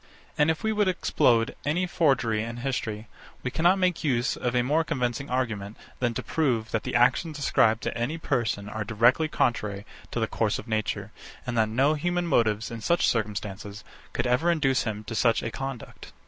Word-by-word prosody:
And 150 +1 +3
if 160 +4 -1
we 220 - +1
would 210 -2 +2
explode 120 -10 +2
any 170 +5 0
forgery 135 -11 +1
in 115 +1 -5
history, 115 -4 -3 0.4
we 130 - -2
cannot 175 +7 +3
make 185 -3 +1
use 125 -5 +1
of 125 0 -2
a 125 - +3
more 150 +6 +2
convincing 130 -3 -2
argument, 110 -5 -2 0.2
than 120 -2 0
to - - -3
prove, 120 -9 0
that 115 - 0
the - - -4
actions 145 +6 +2
ascribed 115 -5 +2
to - - -2
any 120 +8 -2
person 115 -10 -1
are 110 +1 -4
directly 120 +8 +3
contrary 105 -8 -1 0.2
to - - -3
the - - +2
course - - 0
of - - -9
nature, 110 -2 -2 0.3
and 125 - -3
that 110 -1 +2
no 135 +7 +3
human 175 +3 -1
motives, 110 -9 +1
in 115 -1 -6
such 170 +9 +2
circumstances, 105 -2 -3 0.3
could - - -2
ever 125 +8 +2
induce 135 -6 +2
him 105 -2 -3
to 110 - -7
such 115 +1 +2
a 115 - -3
conduct. 135 +2 -7
120 Hz, 190 wpm, -26 LUFS, 110-150 Hz, 0.4 s, And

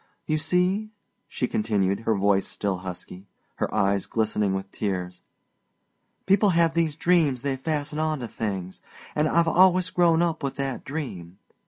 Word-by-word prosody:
You 155 0 0
see," 180 +6 +1 0.4
she 125 - -2
continued, 100 -4 0
her 115 -1 0
voice 100 0 +2
still 100 -2 -2
husky, 90 +1 -8 0.3
her - - -1
eyes 100 0 +1
glistening 105 -3 0
with 95 0 -5
tears, 90 -3 -3 1.0
"people 200 +2 +4
have 165 -1 +3
these 165 -3 +1
dreams 155 -7 +2
they 140 -1 0
fasten 150 +2 -3
onto 155 -5 -1
things, 95 -5 -5 0.3
and 150 +1 +1
I've 170 +1 +3
always 185 +1 +4
grown 170 -1 +3
up 165 -2 -1
with 140 -1 -3
that 135 -2 -3
dream. 95 - -6
135 Hz, 150 wpm, -25 LUFS, 100-165 Hz, 1.0 s, people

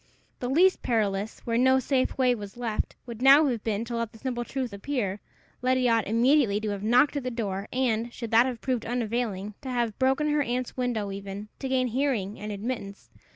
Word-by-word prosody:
The 245 - -3
least 360 +7 +4
perilous, 210 -2 -1
where 230 0 0
no 260 +1 +5
safe 260 0 0
way 255 -2 +4
was 205 -2 -8
left, 230 -3 -2
would 235 -1 -8
now 275 +4 +8
have 240 -6 -1
been 220 0 -1
to 235 0 -4
let 230 -2 -3
the - - -12
simple 245 0 -3
truth 255 -2 -4
appear; 200 -2 -3 0.4
Letty 255 0 +2
ought 230 -3 +2
immediately 230 -1 +3
to 215 - -2
have 200 -1 -4
knocked 245 +7 +3
at 280 - -3
the 255 - -2
door, 205 -4 -3
and, 240 -2 0
should 230 -2 -7
that 230 +3 +6
have 245 -3 -5
proved 250 -4 -1
unavailing, 225 -4 -2
to 265 - -6
have 240 -4 -1
broken 270 +3 +2
her 295 0 +2
aunt's 250 -2 -2
window 235 -5 -1
even, 200 +1 -7
to 265 - -4
gain 260 -1 +2
hearing 240 -5 -1
and 210 +1 -5
admittance. 205 -1 -5
240 Hz, 205 wpm, -27 LUFS, 215-260 Hz, 0.4 s, now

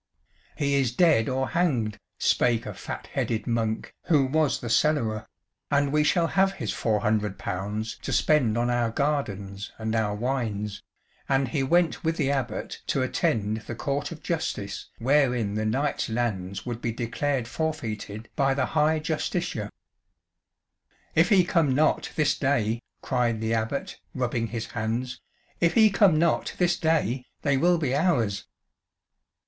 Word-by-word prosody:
"He 140 -1 +1
is 135 -4 +2
dead 155 -10 +4
or 130 0 -1
hanged," 125 - 0 0.2
spake 120 -2 +2
a - - -5
fat - - -7
headed 110 -2 -1
monk 115 -2 -1
who 145 -5 +4
was 150 +2 +1
the 120 - -6
cellarer, 115 -3 +1 0.4
"and 140 -1 +2
we 150 0 +4
shall 160 +3 +3
have 195 +3 +2
his - - -3
four 110 -3 0
hundred 105 -2 0
pounds 105 +4 -4
to - - -4
spend 125 -8 +3
on 120 +1 +1
our 120 -1 +1
gardens 105 -8 -2
and 110 0 -2
our 105 -2 +1
wines," 105 -4 -2 0.5
and 135 -1 +2
he 135 - 0
went 170 +5 +2
with 160 +1 0
the 140 -3 +1
Abbot 135 -3 -3
to - - +1
attend 110 -1 0
the 110 +1 -7
court 140 +5 -2
of 160 - -9
justice 105 - -3
wherein 125 -4 +2
the 110 +1 -1
knight's 140 +5 0
lands 100 -5 -2
would 120 -1 -5
he 115 - 0
declared 120 +2 -2
forfeited 115 -8 -4
by 135 -2 +2
the 130 -2 +1
High 155 0 +3
Justiciar. 155 - -2 1.4
"If 165 +4 +4
he 195 -4 +6
come 160 -6 +2
not 155 +2 +2
this 155 -2 +2
day," 115 -5 0 0.2
cried 120 -3 0
the 110 +1 -1
Abbot, 110 +4 -2 0.2
rubbing 120 -3 -1
his 115 0 -4
hands, 120 +3 -3 0.4
"if 170 0 +2
he 220 -2 +6
come 195 -5 +5
not 165 0 +1
this 175 -1 +3
day, 150 -6 +1 0.2
they 140 -2 +2
will 175 +5 +3
be 145 -6 -1
ours." 120 - +1
125 Hz, 155 wpm, -26 LUFS, 110-150 Hz, 1.4 s, he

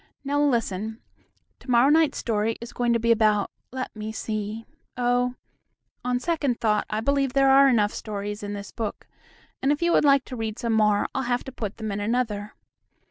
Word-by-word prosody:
Now, 285 +1 0
listen, 225 -5 0 0.6
to - - -15
morrow 245 +2 +5
night's 320 -1 +3
story 225 0 -1
is 235 +1 -9
going 240 -1 0
to 230 - +2
be 230 +1 +2
about 215 -3 +3 0.2
let 255 -1 -5
me 215 0 -5
see 215 0 -4 0.3
Oh! 245 0 +1 0.7
on 250 0 0
second 285 -5 -1
thought 210 -2 +1
I 215 +1 -1
believe 275 +1 +1
there 275 -1 +4
are 275 0 +7
enough 215 -4 +2
stories 205 0 -5
in 205 0 -5
this 200 -1 -7
book, 220 -3 -5 0.6
and, 270 - +2
if 295 +3 0
you 345 - +3
would - - +4
like 275 -2 +4
to 255 - -7
read 220 -2 -4
some 235 -2 -1
more 210 -2 +3
I'll 270 - -1
have 245 -1 -1
to 265 - -8
put 215 -4 -5
them 220 -2 -4
in 200 - -3
another. 210 -1 -2
230 Hz, 195 wpm, -25 LUFS, 215-260 Hz, 0.7 s, are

